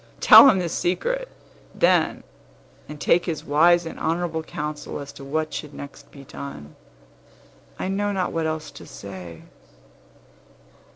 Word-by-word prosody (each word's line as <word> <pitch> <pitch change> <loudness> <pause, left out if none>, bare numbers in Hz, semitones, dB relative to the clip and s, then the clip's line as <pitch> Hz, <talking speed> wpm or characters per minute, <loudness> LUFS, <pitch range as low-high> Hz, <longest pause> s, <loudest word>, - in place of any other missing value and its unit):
Tell 275 - +9
him 195 - +3
the 180 -2 -1
secret, - - -2 0.5
then, - - +2 0.7
and 150 0 -9
take 175 +4 +3
his 160 -3 -4
wise 170 +4 +4
and 165 - -8
honorable 165 0 -1
counsel 150 -2 -6
as 140 -1 -9
to - - -11
what 155 +3 -3
should 150 -1 -6
next 140 0 -11
be 140 - -13
done. 135 - -9 1.0
I - - -3
know 205 +2 -1
not 190 -2 -1
what 165 -1 -1
else 155 -1 -4
to 140 - -13
say." 90 -5 -10
155 Hz, 140 wpm, -23 LUFS, 140-175 Hz, 1.0 s, Tell